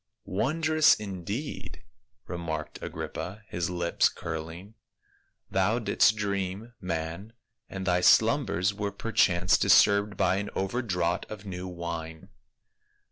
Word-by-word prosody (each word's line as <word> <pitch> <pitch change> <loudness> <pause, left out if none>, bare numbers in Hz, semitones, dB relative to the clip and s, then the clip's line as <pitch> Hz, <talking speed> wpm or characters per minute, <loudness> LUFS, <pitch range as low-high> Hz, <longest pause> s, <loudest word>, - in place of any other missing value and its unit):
" - - -57
"Wondrous, 155 - +3
indeed!" 105 - -6 0.4
remarked 80 -3 -5
Agrippa, 100 +4 -6
his 85 -1 -2
lips 85 -1 +2
curling. 85 +5 -7 0.4
" - - -40
Thou 95 +4 +2
didst 110 -1 +3
dream, 100 +2 -3
man, 85 +4 -4 0.4
and 95 -1 -5
thy 90 -1 +2
slumbers 100 - +4
were 100 0 -3
perchance 100 -3 +2
disturbed 100 +1 +4
by 95 - +2
an 100 +1 -3
over 95 +6 -1
draught 90 -6 -1
of 105 -1 -8
new 90 -1 -5
wine." 85 -2 -6
95 Hz, 120 wpm, -28 LUFS, 85-105 Hz, 0.4 s, slumbers